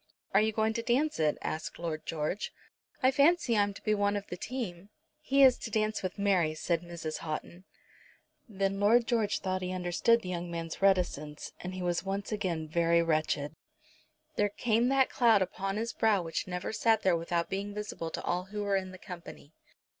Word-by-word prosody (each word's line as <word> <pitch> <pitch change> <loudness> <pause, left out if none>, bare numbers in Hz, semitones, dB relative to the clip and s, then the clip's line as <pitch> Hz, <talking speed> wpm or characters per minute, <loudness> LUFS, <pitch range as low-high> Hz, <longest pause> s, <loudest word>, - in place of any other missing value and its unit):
"Are 195 - +6
you 220 +1 +2
going 220 0 +1
to 230 - -2
dance 255 - +1
it?" 155 -1 +2
asked 155 - -4
Lord 160 -2 -4
George. 165 +5 -2 0.5
"I 260 - +6
fancy 285 -3 +4
I'm 205 -1 +3
to - - -12
be 215 - +2
one 205 0 +1
of 200 - -5
the 180 - -6
team." 200 -4 -5 0.3
"He 275 -2 +3
is 255 -2 +6
to - - -5
dance 215 0 0
with 185 +1 -4
Mary," 185 -6 +2
said 165 +1 0
Mrs. 170 -2 -5
Houghton. 170 +3 -6 0.8
Then 195 -1 -1
Lord 225 +4 +5
George 225 -3 0
thought 185 -1 -1
that 185 - -4
he - - -3
understood 185 +6 +2
the 180 - -5
young 175 -1 -3
man's 165 0 -5
reticence, 175 -6 +1
and 180 +1 -6
he 185 - -4
was 175 0 0
once 195 +2 -3
again 175 -7 -2
very 170 +1 +3
wretched. 155 -2 0 0.8
There 205 0 +3
came 230 +3 +1
that 270 -1 +3
cloud 225 -5 +5
upon 195 +2 -3
his 230 +1 -2
brow 210 -5 +2
which 165 +2 -3
never 180 +3 -4
sat 220 +1 +2
there 185 -2 +4
without 170 0 -1
being 200 +1 -3
visible 210 -6 -4
to - - -5
all 180 +1 -1
who 205 +2 -4
were 200 -1 +1
in 190 -1 -3
the - - -9
company. 175 -5 -10
195 Hz, 200 wpm, -30 LUFS, 170-215 Hz, 0.8 s, Are